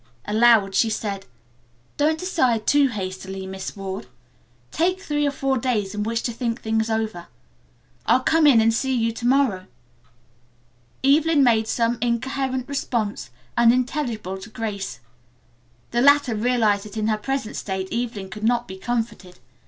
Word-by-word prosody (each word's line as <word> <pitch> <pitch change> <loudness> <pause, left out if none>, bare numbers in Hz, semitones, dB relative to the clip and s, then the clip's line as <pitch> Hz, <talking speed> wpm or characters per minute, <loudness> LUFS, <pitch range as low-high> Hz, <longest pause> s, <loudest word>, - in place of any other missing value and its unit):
Aloud 215 -2 +4
she 225 +4 +3
said: 205 -3 -4 0.7
"Don't 310 +2 +2
decide 260 - 0
too 285 -1 +4
hastily, 190 -3 -5
Miss 190 0 -6
Ward. 190 -5 -5 0.6
Take 365 +4 +1
three 295 -5 -1
or - - +1
four 270 -1 -1
days 220 -6 -1
in 210 - -3
which 230 +2 -1
to 240 - -1
think 235 0 -2
things 220 0 -1
over. 220 -6 -2 0.8
I'll 255 - +4
come 320 +1 +4
in 240 -6 +6
and 225 0 +3
see 265 +3 0
you 230 -1 +1
to 235 +1 -3
morrow." 245 -9 +2 1.4
Evelyn 295 +2 +4
made 225 -3 +3
some 235 +1 0
incoherent 260 +2 -1
response, 225 - -2 0.3
unintelligible 235 -4 +1
to 200 - -10
Grace. 210 - -5 0.9
The 240 - +1
latter 285 -2 +5
realized 220 -2 +1
that 210 +1 -9
in 215 - -1
her 215 -1 +1
present 270 0 -3
state 190 -1 -4
Evelyn 225 -5 -3
could 210 0 -8
not 240 +1 +1
be 190 - -8
comforted. 225 -4 -4
230 Hz, 150 wpm, -23 LUFS, 210-260 Hz, 1.4 s, in